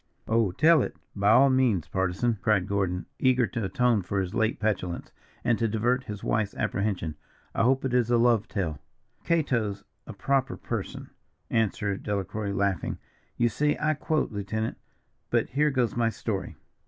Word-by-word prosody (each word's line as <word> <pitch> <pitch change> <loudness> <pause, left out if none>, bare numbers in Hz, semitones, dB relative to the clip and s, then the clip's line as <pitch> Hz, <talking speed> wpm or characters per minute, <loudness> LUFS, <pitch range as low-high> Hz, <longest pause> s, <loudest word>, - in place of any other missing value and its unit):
"Oh, 110 -4 +2
tell 155 - +5
it, - - -3 0.2
by 100 0 +2
all 135 +5 +6
means, 125 - +2
Partisan," 95 +5 0
cried 105 -4 +2
Gordon, 95 -3 -1
eager 130 -1 +4
to 115 -1 -4
atone 115 +3 +2
for 100 +2 -2
his 95 -1 -2
late 110 0 +1
petulance, 95 -5 -2 0.3
and 120 -2 +2
to 115 - +2
divert 120 +4 0
his 105 -1 -7
wife's 105 -2 0
apprehension; 95 -7 -2 0.4
"I - - 0
hope 130 +3 +3
it 130 - -1
is 125 -2 +2
a 120 - +4
love 115 -3 +3
tale." 80 -8 -3 0.4
"'Cato's 115 -11 0 0.2
a - - -7
proper 135 +5 0
person'" - - -5 0.4
answered 105 -3 0
Delacroix, 100 0 -2
laughing. 100 -2 -1 0.4
"You 120 - +3
see 150 +7 +1
I 155 +1 +2
quote, 155 -1 -1
lieutenant. 110 +2 -3 0.5
But - - +1
here 150 +3 +2
goes 125 -4 0
my 115 -1 +2
story. 100 -4 -4
110 Hz, 165 wpm, -27 LUFS, 100-125 Hz, 0.5 s, all